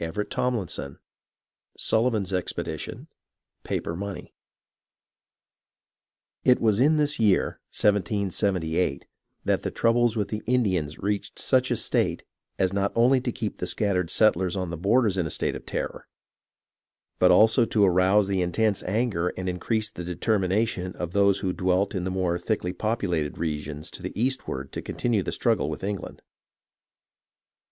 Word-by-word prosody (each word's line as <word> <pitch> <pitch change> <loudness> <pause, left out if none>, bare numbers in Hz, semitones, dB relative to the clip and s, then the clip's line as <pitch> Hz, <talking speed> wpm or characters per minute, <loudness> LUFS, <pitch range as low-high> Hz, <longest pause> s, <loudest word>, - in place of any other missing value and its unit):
CHAPTER 100 +6 -2
XXV 95 - -2 0.8
Sullivan's 110 -4 +1
expedition, 90 -1 -4 0.6
paper 85 - -3
money 100 +2 -6 2.1
It 125 - +5
was 110 -2 +2
in 150 +5 +5
this 150 -1 +1
year, 105 -4 +2 0.2
1 105 -1 +4
778, 90 -5 -1 0.4
that - - +1
the - - -2
troubles 115 0 +2
with 105 - -1
the 105 0 -3
Indians 95 -12 +1
reached 100 +1 -3
such 130 -1 +2
a - - +1
state - - 0 0.3
as 95 -1 +1
not 100 0 0
only 125 +3 +4
to 125 - -2
keep 110 -2 -4
the 90 - -3
scattered 90 -3 0
settlers 95 -4 +3
on 90 -3 -3
the - - -3
borders 100 +3 +2
in 85 - 0
a - - -5
state - - -1
of - - -9
terror, - - -4 1.1
but - - +6
also 110 +2 +6
to 105 -3 +3
arouse 95 +2 +4
the 95 -2 0
intense 100 +4 +1
anger 100 -3 0
and 95 - -4
increase 110 +5 -1
the 90 - -7
determination 95 +1 0
of 85 -1 -4
those 100 0 +3
who 95 -2 -1
dwelt 95 +3 +1
in 90 -3 -2
the - - -1
more 90 -2 0
thickly 90 -1 -2
populated 90 -7 -1
regions 75 -1 -4
to - - -10
the - - -6
eastward 115 - -2
to - - -5
continue 115 -4 -1
the - - -3
struggle - - +1
with - - -6
England. 100 -1 -5
100 Hz, 150 wpm, -26 LUFS, 90-110 Hz, 2.1 s, but